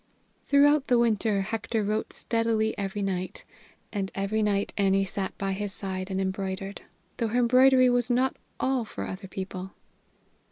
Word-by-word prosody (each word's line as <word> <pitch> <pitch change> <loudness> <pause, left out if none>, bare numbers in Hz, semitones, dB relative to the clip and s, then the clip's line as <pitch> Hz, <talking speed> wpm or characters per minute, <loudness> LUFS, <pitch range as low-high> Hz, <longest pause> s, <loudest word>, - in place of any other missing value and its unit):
Throughout 290 0 +5
the 245 - +4
winter 220 -3 +2
Hector 220 +2 -2
wrote 215 +2 -1
steadily 230 -1 0
every 200 +1 -3
night, 185 -2 -3 0.5
and 195 -2 -2
every 200 +3 0
night 205 -1 0
Annie 195 -1 +2
sat 190 0 -4
by 195 0 -2
his 200 +1 -3
side 190 -1 -4
and 190 0 -2
embroidered 195 +1 -3 0.4
though 230 - 0
her 225 +3 -1
embroidery 255 +1 +6
was 245 0 +2
not 255 +2 +2 0.2
all 260 -2 +1
for 220 - -6
other 190 +1 -6
people. 190 0 -6
205 Hz, 155 wpm, -27 LUFS, 195-235 Hz, 0.5 s, embroidery